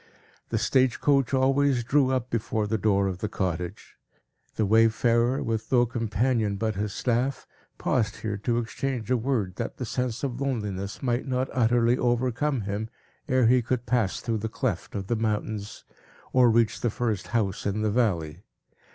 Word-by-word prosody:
The 115 - 0
stage 130 +2 +2
coach 135 -4 +2
always 135 -1 +2
drew 135 +2 +3
up 130 -2 -1
before 110 -1 -1
the 110 +1 -1
door 100 -1 +2
of 95 -2 -2
the 105 - -3
cottage. 90 +1 -4 0.6
The 110 - +1
wayfarer, 115 +4 +3
with 110 -1 -3
no 120 -2 +5
companion 115 -1 0
but 110 +2 -1
his 105 +1 -3
staff, 125 +5 -1 0.3
paused 110 -4 0
here 105 -2 -4
to 115 +3 -1
exchange 120 0 -3
a - - +5
word, 110 -7 -1
that - - -4
the 125 - -4
sense 125 +1 -3
of 130 -1 -3
loneliness 105 -7 -3
might 125 +1 0
not 130 0 -1
utterly 120 0 +3
overcome 125 +2 0
him, 105 +2 -3 0.4
ere 130 -1 +3
he 125 +2 +5
could 125 +1 -2
pass 115 -5 0
through 115 -2 -1
the 110 +2 -3
cleft - - -3
of 100 -1 -3
the 120 - 0
mountain, 110 -1 -1 0.7
or 125 -2 +6
reach 115 -1 +2
the 120 - +1
first 110 -3 -2
house 105 -5 -1
in 105 +2 -1
the 105 - +1
valley. 90 -8 0
115 Hz, 170 wpm, -26 LUFS, 105-125 Hz, 0.7 s, or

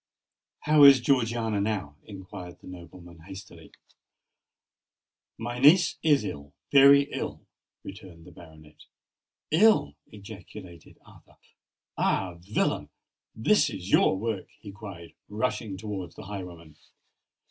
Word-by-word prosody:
"How 150 -1 +4
is 140 -2 +9
Georgiana 115 -4 0
now?" 100 -9 -3
inquired 95 -3 -10
the - - -18
nobleman 85 -1 -13
hastily. 95 +3 -12 1.7
"My 120 +2 -5
niece 160 +7 +5
is 150 -3 +2
ill—very 135 - +3
ill," - - -6 0.4
returned 90 -4 -12
the 90 - -14
baronet. 80 -3 -17 0.7
"Ill!" 215 +8 +4
ejaculated 100 -4 -13
Arthur. - - -20 0.6
"Ah! 95 -2 0
villain—this 110 - -2
is 95 -3 -8
your - - +4
work!" 110 -1 -4
he 100 - -10
cried, 95 -5 -11 0.2
rushing 105 -2 -3
towards 95 -4 -7
the - - -10
highwayman. 90 -6 -9
100 Hz, 105 wpm, -26 LUFS, 90-120 Hz, 1.7 s, is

